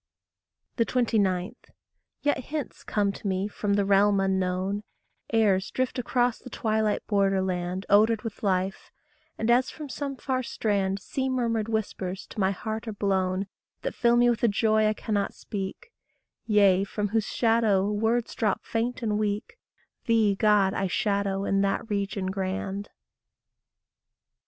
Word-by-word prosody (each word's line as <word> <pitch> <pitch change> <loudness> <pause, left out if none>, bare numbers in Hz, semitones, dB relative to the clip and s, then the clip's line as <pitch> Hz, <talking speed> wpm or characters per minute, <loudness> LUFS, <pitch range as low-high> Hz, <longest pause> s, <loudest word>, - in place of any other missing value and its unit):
29. 210 -7 0 0.7
Yet 290 -4 0
hints 300 -3 -5
come 205 -1 0
to 200 - -7
me 190 +1 0
from 205 -1 -1
the 200 -1 +2
realm 200 0 +4
unknown; 190 +1 0 0.5
Airs 205 -4 +3
drift 255 0 -2
across 245 -1 +1
the 255 - -11
twilight 220 -3 0
border 195 -2 +2
land, 185 0 -2
Odoured 215 +2 +4
with 225 -3 -6
life; 190 -1 -1 0.5
and 225 +2 +1
as 250 +2 +3
from 300 -2 -8
some 275 +4 -4
far 260 0 -2
strand 200 -5 -1
Sea 265 +5 -3
murmured, 230 -4 0
whispers 195 -3 -3
to - - -7
my 190 -1 +3
heart 220 +3 -4
are 220 - -3
blown 190 -1 0 0.4
That - - -2
fill 235 -1 +3
me 240 0 +5
with 235 -2 +1
a - - +6
joy 215 0 +3
I 215 - +2
cannot 205 -2 -2
speak, 195 - -6 0.6
Yea, 200 -3 +5
from 205 +1 -2
whose 220 0 0
shadow 225 -4 +2
words 225 +3 0
drop 210 -4 -1
faint 235 +2 -2
and 210 -2 0
weak: 210 - -2 0.5
Thee, 225 -4 +3
God, 205 -2 +3
I 195 - 0
shadow 200 -1 0
in 195 0 +2
that 200 +3 -1
region 200 -1 -1
grand. 195 +1 -3
210 Hz, 145 wpm, -27 LUFS, 195-230 Hz, 0.7 s, a